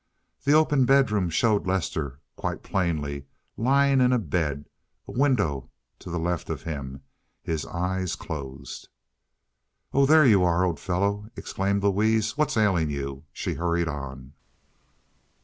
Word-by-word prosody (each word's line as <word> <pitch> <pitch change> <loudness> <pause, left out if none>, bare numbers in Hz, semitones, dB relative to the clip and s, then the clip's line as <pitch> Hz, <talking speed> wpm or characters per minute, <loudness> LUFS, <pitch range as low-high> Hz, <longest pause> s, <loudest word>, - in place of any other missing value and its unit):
The 140 - +4
open 150 -4 +4
bedroom 115 -9 +3
showed 105 +3 +1
Lester 80 -7 -2 0.2
quite - - -4
plainly 75 -7 -2 0.3
lying 135 +2 +3
in 125 0 +4
bed, 75 -4 -1 0.4
a - - -7
window 125 - +1 0.3
to - - -10
the 85 - -2
left 85 0 -2
of - - -4
him, 70 -4 -6 0.4
his 80 -2 -3
eyes 90 0 -2
closed. 70 -7 -7 1.1
"Oh, 135 0 +4
there 155 0 +7
you 100 -7 +5
are, 90 +1 +3
old 85 -3 -1
fellow!" 100 +3 -1
exclaimed 100 +1 -1
Louise. 110 +2 +2
"What's 150 -4 0
ailing 95 -8 +2
you?" 70 0 -5
she - - -3
hurried 85 0 0
on. 70 -3 -6
90 Hz, 130 wpm, -26 LUFS, 75-110 Hz, 1.1 s, there